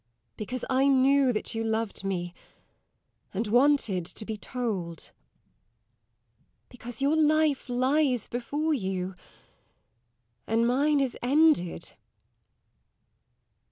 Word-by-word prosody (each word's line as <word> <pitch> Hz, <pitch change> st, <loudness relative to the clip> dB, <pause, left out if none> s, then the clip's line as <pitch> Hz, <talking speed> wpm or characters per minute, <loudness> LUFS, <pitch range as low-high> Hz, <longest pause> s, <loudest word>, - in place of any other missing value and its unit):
Because 245 Hz, +4 st, -5 dB
I 265 Hz, +1 st, +2 dB
knew 270 Hz, 0 st, +4 dB
that 215 Hz, -, -3 dB
you 225 Hz, 0 st, -2 dB
loved 220 Hz, -2 st, -2 dB
me, 175 Hz, -3 st, -3 dB, 1.0 s
and 215 Hz, +5 st, -1 dB
wanted 240 Hz, -5 st, +3 dB
to 215 Hz, -, -6 dB
be 220 Hz, -, -4 dB
told. 205 Hz, -8 st, -4 dB, 1.6 s
Because 245 Hz, +1 st, -7 dB
your 290 Hz, +3 st, +3 dB
life 310 Hz, -3 st, +2 dB
lies 255 Hz, 0 st, +1 dB
before 290 Hz, +6 st, -2 dB
you, 190 Hz, -6 st, -3 dB, 1.3 s
and 225 Hz, +1 st, +2 dB
mine 285 Hz, +5 st, +2 dB
is 265 Hz, -3 st, -1 dB
ended. 280 Hz, -, +2 dB
245 Hz, 95 wpm, -27 LUFS, 215-280 Hz, 1.6 s, knew